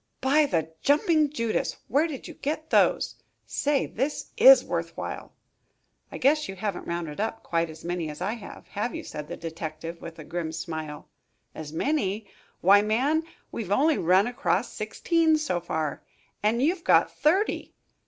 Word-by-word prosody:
"By 290 +3 +3
the 160 - -1
jumping 300 +1 +3
Judas! 230 -6 -1
Where 290 +6 +2
did 285 -5 -7
you - - -8
get 310 +2 -4
those? - - +3 0.3
Say, 290 -1 0
this 270 +6 -3
is - - +8
worth - - -3
while." - - -5 0.8
"I - - -6
guess 300 +1 +2
you 195 - -5
haven't 200 -1 -4
rounded 170 -2 -4
up 225 +1 -3
quite 165 -1 0
as 160 +1 -11
many 175 -2 -2
as 150 - -8
I 195 +4 -1
have, 225 -4 -10
have 215 +4 -3
you?" - - -5
said 150 -1 -7
the 175 - -6
detective, 165 0 -6
with 165 -1 -9
a 155 - -8
grim 165 0 -4
smile. 160 -2 -6 0.5
"As 155 -2 -7
many? 210 - -1 0.4
Why, 200 +3 +7
man, 255 +9 +2 0.3
we've 205 -5 -5
only 290 +8 +3
run 185 +4 +4
across 245 +4 -1
sixteen 330 -2 +1
so 285 -13 -1
far, 160 -3 -3 0.4
and 225 +4 +2
you've 335 +3 +1
got - - +4
thirty. 375 +8 +1
210 Hz, 165 wpm, -26 LUFS, -, 0.8 s, is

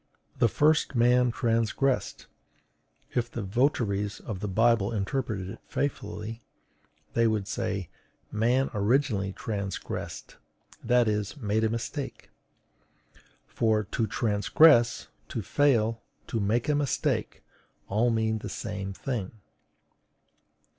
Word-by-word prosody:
"The - - +5
first 150 +4 +2
man 125 +1 +4
transgressed." 115 +3 0 0.9
If 120 -1 -1
the 115 -2 -5
votaries 105 -2 0
of 105 -5 -6
the 105 - -3
Bible 110 +1 +3
interpreted 110 -2 -2
it 95 - -8
faithfully, 115 -5 -3 0.7
they 115 0 +3
would 105 -3 0
say: 100 -4 -2 0.4
MAN 120 +5 +1
ORIGINALLY 105 -2 +1
TRANSGRESSED, 100 -3 -5 0.5
that 120 0 +3
is, 105 +1 -1
made 110 -3 0
a 110 - +3
mistake; 115 +5 -5 1.1
for 110 -2 +1
TO 110 +2 -2
TRANSGRESS, 115 +4 +4 0.2
TO 115 - -3
FAIL, 115 -4 +2 0.2
TO 115 - -2
MAKE 110 +6 +1
A 150 - +3
MISTAKE, 145 -3 -1 0.4
all 110 +5 +2
mean 110 -1 +1
the - - -6
same 100 -3 -5
thing. 110 -3 -4
115 Hz, 110 wpm, -28 LUFS, 105-125 Hz, 1.1 s, The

